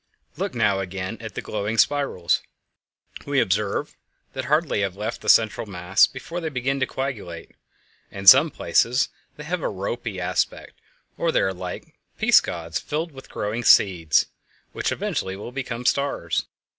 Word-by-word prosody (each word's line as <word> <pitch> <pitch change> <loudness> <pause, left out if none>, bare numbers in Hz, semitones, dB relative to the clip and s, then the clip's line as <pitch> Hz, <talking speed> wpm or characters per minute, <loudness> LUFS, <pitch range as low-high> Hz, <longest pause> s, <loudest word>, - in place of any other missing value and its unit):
Look - - -3
now 105 -4 +2
again 95 +2 -5
at 110 -4 -8
the - - -4
glowing 105 +1 -3
spirals. 140 - +2 0.9
We 140 -1 +2
observe 100 -1 0 0.4
that 130 -1 -4
hardly 150 -5 +1
have 95 -2 -2
they - - -16
left 110 +3 -4
the - - -3
central 110 0 +4
mass 95 +1 +3
before 165 +7 -7
they 160 - -2
begin 135 0 -1
to 130 - +1
coagulate. 105 -11 -5 0.6
In 95 0 -8
some - - +9
places 125 +3 +1 0.3
they 150 - -8
have 175 +3 -3
a - - -1
"ropy" 100 +1 -4
aspect; 90 - -2 0.5
or - - +1
they - - +2
are 95 - 0
like 90 -1 -7 0.2
peascods 85 -1 +2
filled 160 +3 -3
with 135 -2 -13
growing 110 +4 -3
seeds, 90 -7 +4 0.5
which - - -1
eventually 95 0 -2
will 105 +5 -8
become 125 -2 -5
stars. 140 - 0
110 Hz, 155 wpm, -23 LUFS, 95-135 Hz, 0.9 s, some